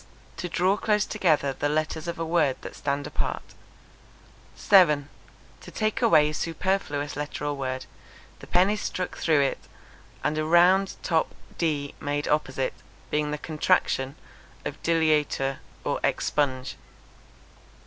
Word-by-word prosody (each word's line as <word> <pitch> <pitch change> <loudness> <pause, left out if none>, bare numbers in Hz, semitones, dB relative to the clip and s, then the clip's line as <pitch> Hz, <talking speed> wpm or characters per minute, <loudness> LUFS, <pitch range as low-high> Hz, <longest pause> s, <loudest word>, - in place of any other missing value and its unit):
To 180 - -4
draw 185 +4 +2
close 210 -1 +1
together 155 -9 +1
the 145 - -1
letters 155 +1 -1
of 170 - -3
a 165 - -2
word 160 -5 +2
that - - -8
stand 140 0 -2
apart. - - -3 1.1
7. 150 -8 +5 0.5
To - - -11
take 215 -1 -1
away 155 -2 +5
a - - -8
superfluous 165 -3 -2
letter 145 0 -4
or 145 - 0
word, 130 -2 -4 0.5
the - - -12
pen 185 +3 +4
is 210 -1 -2
struck 180 -1 -3
through 155 -3 +3
it 135 - 0 0.6
and 155 +1 0
a - - 0
round 180 +4 +4
top 165 -2 0 0.2
d 150 -4 -1
made 145 0 -2
opposite, 135 -3 0 0.4
being 150 0 0
the 150 - -2
contraction 145 -3 0 0.5
of - - -5
_deleatur_='expunge.' 145 -3 0
155 Hz, 130 wpm, -26 LUFS, 145-175 Hz, 1.1 s, 7